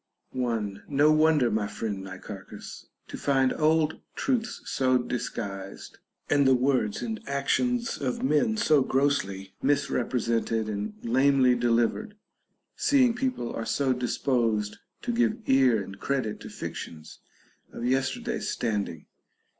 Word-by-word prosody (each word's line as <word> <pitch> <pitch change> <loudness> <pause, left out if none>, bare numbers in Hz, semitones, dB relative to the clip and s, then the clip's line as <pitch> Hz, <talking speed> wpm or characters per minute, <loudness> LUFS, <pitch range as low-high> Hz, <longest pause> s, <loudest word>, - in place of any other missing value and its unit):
1. 115 -6 -2
No 145 +2 +4
wonder, 155 -5 +4
my 105 -1 0
friend 105 -2 -4
Nicarehus, 95 +1 -9 0.2
to - - -7
find 135 -2 +2
old 155 0 +2
truths 245 -3 -1
so 130 -1 +2
disguised, 100 -5 -5 0.3
and 140 -1 +3
the 130 - +6
words 125 -5 +1
and 225 -2 -3
actions 235 - 0
of 130 -3 -2
men 150 - +2
so 155 -10 +4
grossly 100 -9 0
misrepresented 115 -5 0
and 105 0 -4
lamely 130 +1 +4
delivered, 120 - +1 0.6
seeing 260 -4 +4
people 250 - -2
are 115 - -3
so 135 +2 +1
disposed 115 -4 0 0.3
to 240 - -1
give 235 -2 +2
ear 130 -6 +4
and 95 +1 -10
credit 130 -6 -2
to - - -9
"fictions 80 -1 -8 0.5
of 120 - -5
yesterday's 130 +1 -1
standing. 100 -9 -2
130 Hz, 120 wpm, -27 LUFS, 110-145 Hz, 0.6 s, the